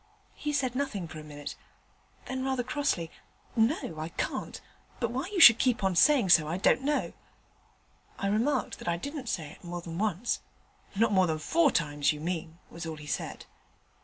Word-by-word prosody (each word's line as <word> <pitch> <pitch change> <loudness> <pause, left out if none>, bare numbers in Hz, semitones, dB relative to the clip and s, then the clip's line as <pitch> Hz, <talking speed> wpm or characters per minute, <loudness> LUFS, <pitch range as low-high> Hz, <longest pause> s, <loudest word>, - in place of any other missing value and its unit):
He 295 - -3
said 270 -4 0
nothing 255 -10 -2
for 160 - -9
a - - -9
minute: 145 -1 -7 0.7
then 260 0 -3
rather 265 -2 0
crossly, 255 - -1 0.4
"No, 225 - +1
I 160 +1 -4
can't; - - -4 0.4
but 235 -1 -1
why 265 +7 -3
you 405 -2 -3
should 240 -8 +10
keep 250 -4 +1
on 190 -2 +1
saying 260 - +5
so 160 -3 +6
I 165 +3 -2
don't 215 +6 +3
know." 290 +2 -1 1.0
I - - -3
remarked 235 +7 0
that - - -9
I 170 0 +1
didn't 280 - -6
say 155 -4 -3
it - - -16
more 175 0 -5
than 170 0 -6
once. 215 +2 0 0.6
"Not 220 +2 +3
more 190 -2 +4
than 160 -1 0
four 325 - +3
times, 145 - +1
you 150 - -8
mean," 165 0 -4
was 170 0 -7
all 160 - -4
he 150 - -10
said. 150 - -4
195 Hz, 190 wpm, -29 LUFS, 165-260 Hz, 1.0 s, should